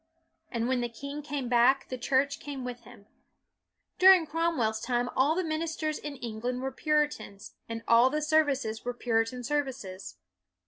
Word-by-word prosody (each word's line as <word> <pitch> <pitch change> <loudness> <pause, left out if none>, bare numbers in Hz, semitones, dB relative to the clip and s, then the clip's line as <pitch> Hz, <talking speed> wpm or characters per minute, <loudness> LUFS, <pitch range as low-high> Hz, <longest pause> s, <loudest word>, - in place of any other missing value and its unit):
And 235 -1 -1
when 255 -1 +1
the 240 - -2
king 280 +5 -7
came 285 -3 -4
back 245 +3 +3
the 255 - -3
Church 275 +3 +1
came 275 -3 -6
with 245 -1 -7
him. 235 -5 -15 0.9
During 370 -2 +8
Cromweirs 305 -9 0
time 245 -1 0
all 285 +5 +3
the 370 - 0
ministers 315 -1 -2
in 295 -1 -6
England 245 +1 -4
were 265 - -2
Puri 300 0 +2
tans, 205 -8 -11 0.2
and 225 0 -5
all 235 +2 +6
the 300 +3 -1
services 285 -8 +1
were 245 0 -3
Puritan 235 +1 -1
services. 250 - -4
260 Hz, 165 wpm, -29 LUFS, 235-295 Hz, 0.9 s, During